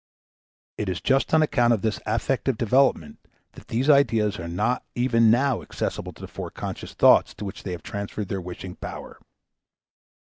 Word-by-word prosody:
It 105 - -2
is 90 -2 -2
just 135 0 +1
on 160 0 +5
account 120 -6 +3
of 110 - -2
this 110 -1 -1
affective 120 +3 0
development 130 +5 +2 0.3
that - - -15
these 125 +5 -1
ideas 115 -9 +3
are 85 - -5
not 105 +9 -1
even 115 -2 +3
now 130 +2 +2
accessible - - -4
to - - -16
the - - -6
foreconscious - - -7
thoughts - - +5
to 105 - -7
which 100 +1 -7
they 90 - -5
have 85 - -7
transferred 100 0 -5
their 95 -2 -2
wishing 90 +1 -8
power. - - -8
115 Hz, 170 wpm, -24 LUFS, 100-130 Hz, 0.3 s, on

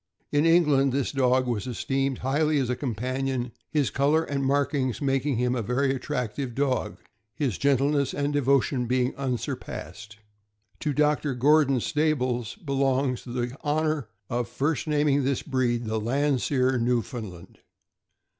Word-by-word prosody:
In 145 +2 +3
England, 150 -6 +4
this 140 -1 0
dog 130 -1 +2
was 115 -4 -2
esteemed 135 +2 -1
highly 150 +3 +2
as 130 -3 0
a - - 0
companion, 130 +1 -2 0.2
his 145 -4 +1
color 145 +4 +2
and 140 -3 -2
markings 135 -2 0
making 135 -1 0
him 125 +1 +1
a 125 - -1
very 135 +5 +1
attractive 125 -1 -3
dog, 130 -6 -1 0.4
his 130 - -1
gentleness 140 0 +2
and 145 +1 -1
devotion 135 -2 +2
being 125 +1 +1
unsurpassed. 110 -4 -5 0.6
To 150 - -1
Dr. 150 -1 +1
Gordon 140 0 +4
Stables 130 -7 0
belongs 135 - 0
the 120 0 -3
honor 155 -4 0 0.2
of 120 0 -2
first 140 +6 -1
naming 145 -2 +2
this 135 0 0
breed 120 -4 0
the 110 0 -2
Landseer 130 +1 +1
Newfound 120 -2 -1
land. 90 +1 -14
135 Hz, 135 wpm, -26 LUFS, 125-145 Hz, 0.6 s, England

